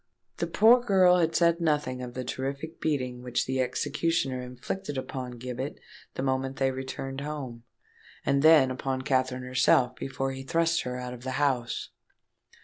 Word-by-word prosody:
The - - -1
poor 240 +3 +6
girl 185 -5 +5
had 165 -2 +1
said 170 0 +3
nothing 150 -5 0
of 125 -1 -7
the 130 - -3
terrific 140 +5 -5
beating 130 -5 -1
which 125 -1 -1
the 130 0 0
executioner 145 0 -1
inflicted 130 +6 -5
upon 130 -1 -5
Gibbet 125 +3 -5 0.4
the 130 - -3
moment 135 0 -1
they 135 -1 +1
returned 135 +1 -5
home, 135 -6 -6 0.6
and 140 0 +2
then 155 -4 +6
upon 130 0 -3
Katherine 130 -1 0
herself 125 0 +3
before 135 0 -3
he 135 0 -6
thrust 165 +4 +1
her 125 0 -4
out 125 0 -5
of 120 - -10
the 130 0 -3
house. 130 -5 0
135 Hz, 160 wpm, -28 LUFS, 125-150 Hz, 0.6 s, poor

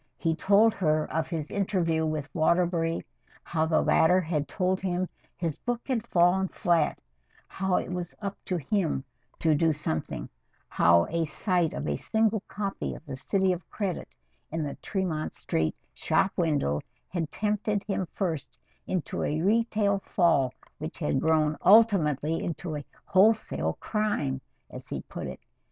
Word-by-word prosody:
He 165 -1 +1
told 205 +5 +4
her 155 -6 +1
of 160 0 0
his 160 -3 -4
interview 175 -5 +1
with 155 -2 -2
Waterbury 170 0 +1 0.4
how 160 -1 0
the 160 -1 +3
latter 175 +3 +5
had 155 -4 -1
told 185 -1 0
him 185 -1 -1 0.3
his 165 -4 -2
book 240 -1 -3
had 250 -5 -1
fallen 180 +2 +3
flat; 170 -4 +1 0.5
how 190 -1 -1
it - - -1
was 180 -1 -4
"up 200 -1 -4
to 180 - -1
him" 165 -3 0 0.3
to 160 -1 +3
do 160 +2 +3
something; 80 - -3 0.4
how 85 0 +4
a 165 0 +1
sight 175 +1 +1
of 70 - -3
a 70 -1 0
single 220 -1 +1
copy 200 -1 -3
of - - -12
"The 135 - -5
City 190 +7 +1
of 175 -1 -8
Credit" 195 -4 -4 0.3
in 160 0 -1
the 145 - -3
Tremont 180 -6 -2
Street 80 -1 -1 0.2
shop 190 - +1
window 145 - +1 0.3
had 165 -4 -2
tempted 210 -1 -1
him 195 -3 -2
first 160 -9 -3 0.3
into 180 -4 -2
a 155 - 0
retail 210 +1 +2
fall 165 -10 +2 0.3
which 155 +2 -6
had 150 -4 0
grown 155 -1 +3
ultimately 165 - +4
into 165 -1 -4
a 145 - -4 0.2
wholesale 215 +3 +3
"crime" 180 - -1 0.3
as - - -10
he - - -5
put - - -6
it. - - -8
170 Hz, 155 wpm, -28 LUFS, 155-195 Hz, 0.5 s, latter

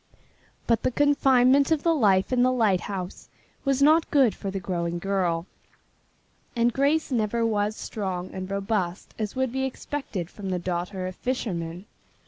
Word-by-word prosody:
But 230 -1 +2
the - - +1
confinement 270 -1 +4
of 315 -3 +1
the 335 - +3
life 205 -6 +3
in 250 - +3
the 255 +1 +4
lighthouse 195 -5 -1 0.3
was 275 0 +2
not 315 +3 +5
good 265 -7 +4
for 195 - -5
the 195 0 -3
growing 175 -2 -2
girl, 175 -3 -1 1.1
and 235 0 +2
Grace 290 +3 +1
never 230 -1 +1
was 210 -1 0
strong 185 -5 -4
and 185 0 -5
robust 195 -2 -2
as 215 +1 -3
would 260 -2 0
be 265 +1 -2
expected 265 - -4
from 195 +1 -7
the 185 - 0
daughter 180 +2 -3
of 185 0 -5
fishermen. 180 -8 -3
210 Hz, 155 wpm, -26 LUFS, 185-260 Hz, 1.1 s, not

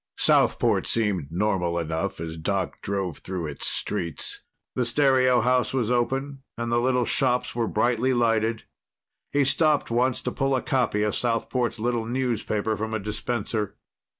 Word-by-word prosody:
Southport - - +3
seemed 100 -10 0
normal 90 -2 0
enough 80 +3 -2
as 80 0 -5
Doc 95 +3 -2
drove 95 -5 -3
through 90 -3 -4
its 75 -2 -5
streets. 85 -4 -3 0.3
The 125 - 0
stereo 130 -1 +3
house 125 +2 +1
was 120 -3 0
open, 135 +3 -1 0.2
and 120 0 -3
the 120 - +3
little 125 -1 +2
shops 125 -1 +1
were 115 -1 0
brightly 120 +3 +1
lighted. 115 -2 +1 0.7
He 145 0 +3
stopped 150 -1 +2
once 125 +2 +2
to - - -1
pull 135 -1 0
a 130 - 0
copy 125 -5 +1
of 105 - 0
Southport's 120 +1 -1
little 115 0 -1
newspaper 115 -4 -1
from 110 +1 -3
a - - -1
dispenser. 105 0 -3
115 Hz, 150 wpm, -25 LUFS, 100-125 Hz, 0.7 s, Southport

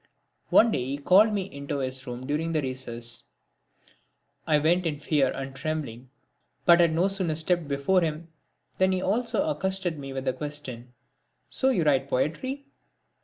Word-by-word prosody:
One 230 0 +5
day 125 - -1
he 135 +3 -3
called 190 +9 +5
me 200 -2 -1
into 140 -5 -5
his 130 0 -3
room 125 +1 -6
during 155 +4 -2
the 155 - +1
recess. 120 -3 -1 1.2
I 155 -2 +4
went 170 +4 +2
in 150 -3 -3
fear 145 -3 +1
and 135 0 -6
trembling 140 -5 -5 0.6
but 170 0 +7
had 170 -2 +4
no 175 +4 +3
sooner 190 -5 0
stepped 165 0 0
before 140 +7 +1
him 160 0 -3 0.5
than 190 0 +3
he 185 - -1
also 240 +8 0
accosted 190 - -1
me 135 -1 -7
with 135 0 -5
the 130 - +1
question: 130 -5 -6 0.5
"So 265 - +2
you 195 -11 +1
write 135 -2 +2
poetry?" 260 - -2
155 Hz, 165 wpm, -26 LUFS, 135-185 Hz, 1.2 s, but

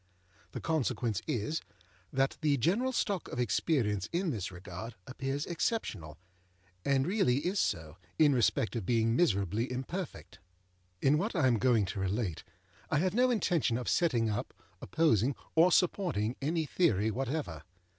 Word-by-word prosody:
The - - -4
consequence 125 - -1
is, 120 +8 -1 0.5
that 135 +1 +1
the 150 -3 +2
general 200 - +1
stock 200 -7 -1
of 125 - -5
experience 105 - 0
in 175 0 0
this 100 -7 -4
regard 90 +5 -8
appears 135 +2 -3
exceptional, 160 - -2 0.7
and 135 -1 +2
really 145 - +1
is 190 +3 0
so, 80 0 -1 0.2
in 150 -3 +5
respect 120 -1 +1
of 115 - -2
being 115 +2 +2
miserably 110 - +1
imperfect. 150 +7 -5 0.6
In 145 +2 +4
what 210 +5 -2
I 160 -6 +2
am 120 -4 +3
going 115 -4 +3
to 95 +2 -5
relate, 95 -2 -2 0.5
I - - +2
have 185 +4 +1
no 250 +3 +3
intention 175 - +1
of 125 - -5
setting 125 -10 +2
up, 105 -1 -3 0.3
opposing, 140 - +2 0.2
or 170 +3 +5
supporting, 165 - +1
any 160 +3 0
theory 110 - +2
whatever. 130 - -3
130 Hz, 145 wpm, -31 LUFS, 110-165 Hz, 0.7 s, in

